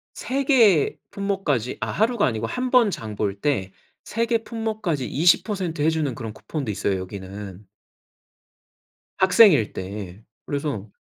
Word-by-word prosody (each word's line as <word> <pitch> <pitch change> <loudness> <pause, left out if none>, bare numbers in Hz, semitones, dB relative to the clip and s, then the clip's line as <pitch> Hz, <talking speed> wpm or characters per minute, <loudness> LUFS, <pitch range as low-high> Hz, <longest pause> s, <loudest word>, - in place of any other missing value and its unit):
3 275 +2 -2
개 225 - +4
품목까지 190 - -1
아 - - -2
하루가 230 +1 +2
아니고 115 -2 -1
1 250 - -3
번 245 -4 +5
장 110 - -6
볼 100 -1 -2
때 100 -8 -1 0.3
3 230 +1 -1
개 230 -1 +1
품목까지 215 - -3
20% 175 0 +1
해 155 - +4
주는 150 -6 -1
그런 115 -4 -6
쿠폰도 140 -4 -5
있어요, 100 -1 -1
여기는. 95 +1 -8 1.5
학생일 190 - +5
때. 95 +1 -7 0.2
그래서 140 -8 -3
145 Hz, 230 characters per minute, -23 LUFS, -, 1.5 s, 번